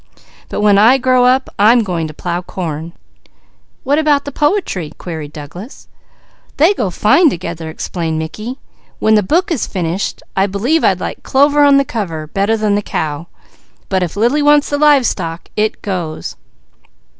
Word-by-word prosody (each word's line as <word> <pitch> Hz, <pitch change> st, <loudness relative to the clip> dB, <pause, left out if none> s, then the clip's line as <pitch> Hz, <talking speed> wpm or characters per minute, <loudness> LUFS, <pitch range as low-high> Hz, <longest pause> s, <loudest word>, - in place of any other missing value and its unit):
But -, -, -3 dB
when 205 Hz, -1 st, +4 dB
I 235 Hz, +6 st, +6 dB
grow 255 Hz, -1 st, +3 dB
up 255 Hz, +1 st, +3 dB
I'm 225 Hz, +3 st, +5 dB
going 170 Hz, -5 st, -2 dB
to 155 Hz, -, -9 dB
plow 175 Hz, +1 st, -3 dB
corn." 165 Hz, -2 st, -6 dB, 0.9 s
"What 285 Hz, +3 st, +1 dB
about 295 Hz, -2 st, +2 dB
the 285 Hz, -, -5 dB
poetry?" 295 Hz, -, -1 dB
queried 160 Hz, -4 st, -7 dB
Douglas. 165 Hz, -, -10 dB, 0.7 s
"They 330 Hz, +7 st, +5 dB
go 215 Hz, -, -2 dB
together 180 Hz, -, +1 dB
fine," -, -, -5 dB
explained 160 Hz, 0 st, -4 dB
Mickey. 215 Hz, +11 st, -5 dB, 0.4 s
"When 220 Hz, -, +2 dB
the 215 Hz, -, +5 dB
book 340 Hz, -, 0 dB
is 290 Hz, -9 st, -1 dB
finished, 180 Hz, 0 st, -3 dB
I'd 195 Hz, +1 st, 0 dB
like 270 Hz, +11 st, 0 dB
clover 285 Hz, +2 st, +3 dB
on 285 Hz, -1 st, +6 dB
the 275 Hz, -, +2 dB
cover 170 Hz, -11 st, -4 dB
better 200 Hz, +7 st, 0 dB
than 215 Hz, -1 st, 0 dB
the 205 Hz, -, +1 dB
cow; 155 Hz, -4 st, -4 dB, 0.6 s
but 190 Hz, -1 st, 0 dB
if 180 Hz, +1 st, -3 dB
Lily 240 Hz, +8 st, +2 dB
wants 295 Hz, 0 st, +3 dB
the 290 Hz, -, 0 dB
live 290 Hz, -4 st, +5 dB
stock 165 Hz, -5 st, -3 dB
it 215 Hz, 0 st, -1 dB
goes!" 175 Hz, -6 st, -4 dB
210 Hz, 160 wpm, -15 LUFS, 170-275 Hz, 0.9 s, I